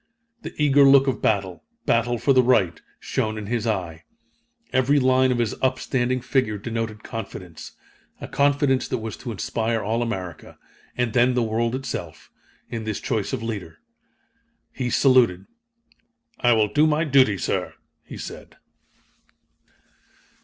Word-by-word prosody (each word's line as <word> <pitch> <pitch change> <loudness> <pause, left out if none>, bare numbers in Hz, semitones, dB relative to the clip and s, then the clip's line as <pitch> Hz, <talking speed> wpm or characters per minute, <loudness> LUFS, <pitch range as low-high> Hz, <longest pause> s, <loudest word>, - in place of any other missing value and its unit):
The - - -8
eager 145 -1 +5
look 135 0 +7
of 135 - -1
battle 95 -4 -1 0.2
battle 120 +1 +1
for 135 +4 +2
the 130 - +6
right 100 -10 +2 0.2
shone 110 0 -2
in 105 - -5
his 115 +1 -2
eye. 90 -7 -3 0.7
Every 130 +3 +3
line 130 0 +3
of 125 - 0
his 115 -3 0
upstanding 130 -1 0
figure 130 -5 0
denoted 110 0 -4
confidence 90 -7 -8 0.5
a - - -7
confidence 140 -2 +1
that 130 - -2
was 110 -2 -6
to 120 - -6
inspire 115 +1 -2
all 110 +3 -1
America, 95 -8 -5 0.4
and 125 -3 0
then 125 +1 +3
the 125 - +2
world 115 +2 -1
itself, 135 0 -6 0.4
in 115 -2 -5
this 110 -2 -3
choice 110 -5 -2
of 130 -4 -3
leader. 110 -4 -5 0.9
He 125 -2 -3
saluted. 120 -9 +3 0.9
"I 120 -1 +4
will 110 -2 +1
do 150 +2 +4
my 155 +1 +1
duty, 130 -9 +4
sir," - - -2 0.3
he - - -10
said. - - -9
120 Hz, 145 wpm, -23 LUFS, 110-130 Hz, 0.9 s, look